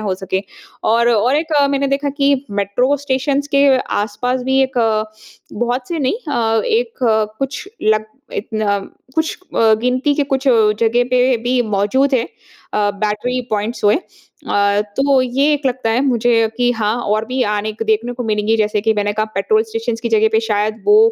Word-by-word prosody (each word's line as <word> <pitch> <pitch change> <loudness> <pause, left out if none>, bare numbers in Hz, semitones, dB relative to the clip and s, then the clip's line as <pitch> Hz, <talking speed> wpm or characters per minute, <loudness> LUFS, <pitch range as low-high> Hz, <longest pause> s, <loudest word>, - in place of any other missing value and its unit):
हो 200 -3 -1
सकें 190 0 -3 0.4
और 235 +2 +3
और 240 +4 +2
एक 315 +1 -2
अ, 290 -2 +4
मैंने 280 0 0
देखा 280 +1 0
कि 280 -1 +2 0.3
मेट्रो 245 +8 +1
स्टेशन्स 275 +1 0
के 280 0 +5 0.3
आस-पास 245 +5 -2
भी 265 0 +3
एक, 260 0 -3 0.8
बहुत 245 +3 -2
से 335 -2 -3
नहीं 285 - 0
अ, 225 -3 +1
एक 465 -3 -1 0.4
कुछ 270 +7 -4
लग 215 0 +2 0.3
इतन 215 +1 -3 0.5
कुछ 320 0 -1 0.2
अ, 225 -1 +4
गिनती 255 +4 +1
के 285 0 0
कुछ 265 +1 -2
जगह 225 +1 +3
पे 250 0 +3
भी 250 +1 +1 0.2
मौजूद 265 +8 +2
हैं 235 -2 +1 0.5
अ, 205 -1 +2
बैटरी 215 +4 -1
पॉइंट्स 215 +2 -2
हुए। 205 - +5 0.5
अ, 200 0 +2 0.2
तो 275 -1 +3
ये 270 +4 +1
एक 290 -1 -2
लगता 255 -3 -1
है 230 +3 +1
मुझे 240 -1 +2 0.2
कि 245 -1 +2
हाँ 220 -2 -1
और 215 +1 0
भी 255 +1 -1
आने 210 +1 -2
क - - +1
देखने 225 +3 0
को 245 - -5
मिलेंगी। 215 +1 +1
जैसे 210 -1 0
कि 220 +1 +2
मैंने 205 0 0
कहा, 215 +1 0
पेट्रोल 205 +3 +2
स्टेशन्स 225 +1 -4
की 235 - -2
जगह 220 -1 +3
पे 220 - +3
शायद 215 0 -1
वो 420 +1 +6
235 Hz, 180 wpm, -17 LUFS, 215-265 Hz, 0.8 s, वो